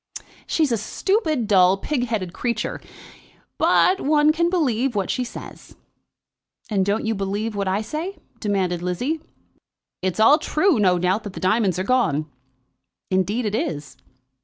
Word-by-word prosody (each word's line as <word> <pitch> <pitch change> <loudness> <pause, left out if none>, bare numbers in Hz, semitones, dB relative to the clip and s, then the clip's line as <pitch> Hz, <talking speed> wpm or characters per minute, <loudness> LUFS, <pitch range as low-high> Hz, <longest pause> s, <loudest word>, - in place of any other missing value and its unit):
"She's 310 -5 +1
a 230 - +2
stupid, 310 - 0
dull, 190 -2 +4
pig 250 +4 -2
headed 195 -6 -3
creature; 235 -3 -3 0.8
but 380 +1 +4
one 300 +1 +4
can 340 +2 +1
believe 270 - 0
what 195 -2 0
she 250 - -1
says." 240 - -10 1.0
"And 195 -2 +2
don't 205 +3 0
you 225 - +1
believe 205 +2 -2
what 200 -1 -2
I 195 +3 0
say?" 325 - -5 0.2
demanded 190 -5 -1
Lizzie. 245 - -2 0.8
"It's 185 +2 -2
all 255 +8 +6
true, 310 - +2
no 185 -3 +4
doubt, 180 +4 +1
that 200 - -6
the - - -7
diamonds 190 -1 +1
are 185 - -1
gone." 195 - +1 0.9
"Indeed 200 +6 0
it 210 - -2
is." 150 -9 -3
215 Hz, 150 wpm, -22 LUFS, 190-275 Hz, 1.0 s, all